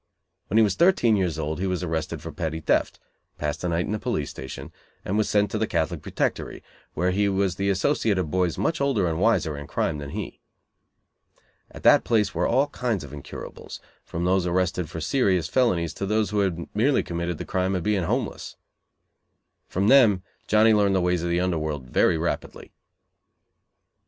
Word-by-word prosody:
When 110 - 0
he 115 - +7
was 100 -3 +2
thirteen 120 - +4
years 90 -5 0
old 80 +1 -3
he 95 - -1
was 90 -1 -2
arrested 80 -1 -3
for 80 - -6
petty 80 -2 -3
theft, 80 - 0 0.4
passed 75 +2 -3
a 90 - 0
night 85 +1 0
in - - -4
the 105 - -1
police - - -2
station, 65 - -8 0.3
and 95 - -1
was 110 -1 +1
sent 105 0 +2
to 110 - -2
the 110 - 0
Catholic 80 -2 -1
Protectory, - - -3 0.3
where 90 +3 +1
he 100 +2 +1
was 95 -1 +1
the 100 +2 -1
associate 100 +1 +1
of 80 -5 -2
boys 90 -2 0
much 165 -3 -1
older 125 -10 +1
and 80 0 -2
"wiser" 95 -7 +2
in 70 0 -8
crime 75 +1 -1
than 70 -1 -6
he. - - -6 1.3
At - - -12
that - - +6
place 110 -3 +1
were - - 0
all 130 +4 +3
kinds 120 - -2
of 70 - -10
incurables, 70 -2 -9 0.2
from 85 +1 -4
those 90 0 +2
arrested 90 -2 0
for 80 - -6
serious 95 - +1
felonies 90 -11 +1
to 100 - -4
those 105 +1 +1
who 105 - 0
had 90 -4 -1
merely 130 +7 +2
committed 85 -1 -3
the - - -6
crime 95 0 0
of 90 - -2
being 100 -3 +1
homeless. - - -3 1.1
From 95 +3 0
them 110 -8 +5 0.2
Johnny 110 +1 +5
learned 100 -2 +3
the - - +3
ways 90 -1 +1
of 85 - -2
the 85 0 +1
under 90 -3 0
world 75 -4 -4
very 80 - +3
rapidly. 85 +2 -4
90 Hz, 195 wpm, -25 LUFS, 85-105 Hz, 1.3 s, he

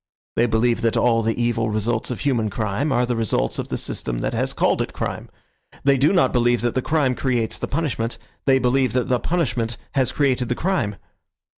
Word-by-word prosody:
They 120 - +3
believe 115 +1 +1
that 115 -2 +1
all 115 -2 +3
the 115 +1 -1
evil 115 -2 +1
results 110 +2 -1
of 125 - -4
human 120 -6 +1
crime 110 +8 -1
are 125 -1 +2
the 120 0 -1
results 115 -3 0
of - - -3
the - - -3
system 60 - -3
that - - -2
has - - 0
called - - +1
it - - -4
crime. - - -4 0.5
They 140 0 +4
do 135 +3 +3
not 185 -3 +3
believe 120 -1 +2
that 120 -1 0
the 130 - 0
crime 145 -3 +1
creates 120 -4 -1
the - - -3
punishment. 140 -7 -2 0.3
They 135 -1 +5
believe 130 -2 +2
that 125 -1 0
the 125 -1 +2
punishment 120 -10 -1
has 130 -3 +1
created 130 -4 +1
the 125 - 0
crime. 160 - -1
120 Hz, 205 wpm, -22 LUFS, 115-135 Hz, 0.5 s, They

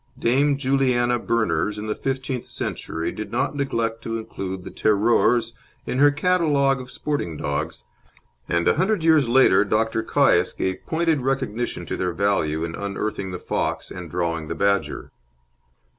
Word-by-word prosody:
Dame 140 +4 +2
Juliana 130 -3 +2
Berners 110 -2 0
in 105 - -5
the 105 - -1
fifteenth 130 -1 -3
century 80 0 -4
did 110 -1 -7
not 125 +4 -1
neglect 115 -5 -1
to 115 0 -3
include 95 -4 -6
the - - -8
"Teroures" 115 +2 +2 0.3
in 125 - -2
her 145 +1 +7
catalogue 145 -4 +2
of 125 - -10
sporting 145 - -3
dogs, 75 -1 -3 0.7
and 85 0 +1
a - - +3
hundred 190 -1 +1
years 155 -6 +4
later 120 -6 +5
Dr. 110 +2 0
Caius 110 - +3
gave 95 -1 -3
pointed 160 -3 +1
recognition 125 -3 -2
to - - -4
their 90 -1 -1
value 80 -5 0
in 80 - -6
unearthing 100 0 -3
the 90 - -4
fox - - -2
and 90 -2 -7
drawing 85 -2 -2
the 80 - -4
badger. 100 +3 0
115 Hz, 155 wpm, -23 LUFS, 95-135 Hz, 0.7 s, her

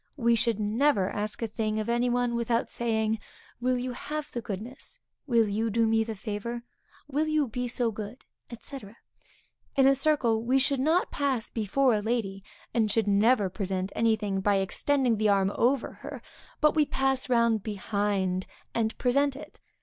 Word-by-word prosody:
We 235 -3 +3
should 230 -2 +1
never 215 -1 +2
ask 210 +2 -3
a - - 0
thing 215 0 -2
of 215 - -3
any 240 +1 +1
one 245 0 +1
without 235 0 0
saying, 220 -2 0 0.4
will 250 +1 +1
you 250 +1 -3
have 300 +4 -5
the 240 - -4
goodness, 225 +3 -7 0.3
will 230 -4 +3
you 220 +3 -1
do 230 +2 +2
me 225 0 +3
the 220 0 -5
favor, 215 +3 -5 0.4
will 295 +2 0
you 310 -2 +2
be 245 +2 -3
so 240 -1 0
good, 215 +3 -8 0.4
&c. 275 - -7 1.0
In 270 -2 +5
a 270 - +7
circle, 270 -6 +2
we 250 +3 +2
should 270 0 +1
not 320 +7 +2
pass 270 -5 -1
before 240 +4 +2
a 210 - +1
lady; 205 -4 -2 0.3
and 220 -3 +2
should 215 0 +1
never 205 +1 +4
present 190 0 -3
any 225 -1 +3
thing 205 -2 -2
by 205 +1 +3
extending 240 +5 +1
the 215 0 +2
arm 195 -1 +3
over 255 +1 +1
her, - - -9 0.4
but 300 0 +5
we 305 -2 +3
pass 270 -1 0
round 235 -3 +3
behind, 200 -2 -1 0.3
and 225 -1 -1
present 275 +2 +2
it. 290 - -11
230 Hz, 175 wpm, -28 LUFS, 210-255 Hz, 1.0 s, a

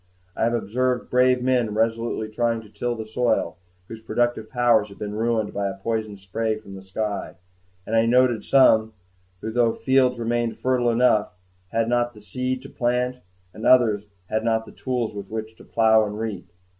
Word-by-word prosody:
I 115 - +1
observed 120 +2 -1
brave 125 0 +3
men 125 -4 +1
resolutely 115 0 0
trying 115 +1 0
to 110 - -16
till 120 +4 -3
the 110 -1 -6
soil, 110 -6 0 0.3
whose 110 -1 -9
productive 120 -1 -1
powers 120 -4 +3
had 100 - -13
been 105 -1 -5
ruined 110 -1 0
by 100 0 -1
a 95 - -7
poison 110 0 -3
spray 110 +3 -2
from 105 -2 -12
the 95 - -9
sky; 100 +2 -4 0.5
and 115 - -2
I 115 0 +4
noted 125 -1 +3
some 110 -5 +4 0.5
who, 110 - -4
though 115 -1 +2
the - - -12
fields 130 -2 +2
remained 120 0 -1
fertile 125 -2 +1
enough, 115 -5 +2 0.3
had 115 +1 0
not 120 0 0
the 105 - -13
seed 125 +5 -3
to - - -10
plant; 125 +1 -1 0.4
and 110 - -10
others 110 -5 +4
who - - -34 0.2
had 110 0 +1
not 110 -1 +1
the - - -12
tools 125 -4 -3
with 100 -1 -7
which 110 0 -5
to - - -14
plow 110 -1 +4
and 105 0 -4
reap. 105 -5 -5
115 Hz, 190 wpm, -23 LUFS, 110-120 Hz, 0.5 s, I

